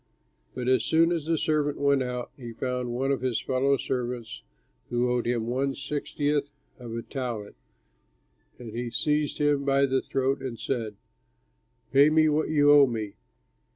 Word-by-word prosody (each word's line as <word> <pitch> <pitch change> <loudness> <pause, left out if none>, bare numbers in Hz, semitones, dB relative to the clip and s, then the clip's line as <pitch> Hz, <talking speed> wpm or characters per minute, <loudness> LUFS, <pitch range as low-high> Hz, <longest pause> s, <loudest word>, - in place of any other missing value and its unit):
"But 125 -1 -4
as 130 -3 +3
soon 165 +7 +3
as 165 -3 -2
the 165 -1 +2
servant 150 -2 0
went 140 -1 +2
out, 125 -1 -4
he 120 -4 -9
found 125 +1 -3
one 130 +3 0
of 135 - -1
his 125 -4 0
fellow 135 +4 +1
servants 125 -3 -4 0.5
who 120 +1 +1
owed 120 -1 0
him 120 -2 0
one 135 +3 -1
sixtieth 145 0 -2 0.3
of 120 -2 -7
a 115 - -4
talent, 120 -7 -5 1.0
and 120 -3 -9
he 120 +2 -4
seized 150 +5 0
him 145 -1 +2
by 140 0 +3
the 135 -1 +1
throat 135 +1 -1
and 130 -3 -5
said, 115 -5 -3 1.0
'Pay 140 +2 +6
me 155 0 +4
what 150 +1 0
you 145 -2 +5
owe 145 -2 +7
me.' 110 -4 -4
130 Hz, 165 wpm, -27 LUFS, 120-145 Hz, 1.0 s, owe